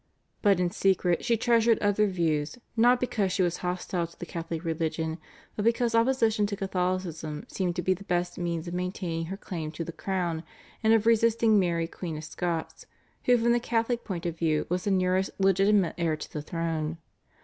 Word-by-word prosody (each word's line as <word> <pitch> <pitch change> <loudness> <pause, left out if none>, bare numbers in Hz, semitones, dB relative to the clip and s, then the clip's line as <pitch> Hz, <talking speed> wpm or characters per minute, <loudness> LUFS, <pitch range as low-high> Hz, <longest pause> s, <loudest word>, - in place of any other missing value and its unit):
But 200 -4 +4
in 175 -1 +1
secret 185 -3 +1
she 235 -1 +2
treasured 230 0 +4
other 205 +1 +2
views, 165 -1 -1 0.2
not 245 +2 +5
because 210 -6 0
she 190 0 +2
was 175 -1 0
hostile 180 -1 -2
to 170 - -20
the - - -6
Catholic 165 -1 -5
religion, 160 0 -2 0.4
but 210 - -2
because 230 +1 +2
opposition 230 -3 +3
to 200 - -3
Catholicism 180 -5 -2
seemed 180 -3 -2
to 175 - -2
be 185 - +3
the 190 +2 -9
best 175 0 -1
means 170 -1 -2
of 170 - -5
maintaining 180 -2 -2
her 195 +3 -5
claim 165 -6 -5
to 165 - -4
the 170 - -6
crown 175 -2 -2 0.4
and 220 - +3
of 225 -1 +4
resisting 230 -1 +4
Mary 170 -3 +1
Queen 165 -2 -6
of 155 - -7
Scots, 165 +1 -4 0.4
who 245 0 +5
from 235 +1 +2
the 240 - +3
Catholic 235 0 0
point 180 -4 -5
of 170 -1 -3
view 155 -2 +1
was 180 +1 -1
the - - +1
nearest 185 0 +2
legitimate 195 -1 +3
heir 165 -2 +1
to - - -9
the 150 - -3
throne. 165 0 -2
180 Hz, 195 wpm, -28 LUFS, 165-210 Hz, 0.4 s, not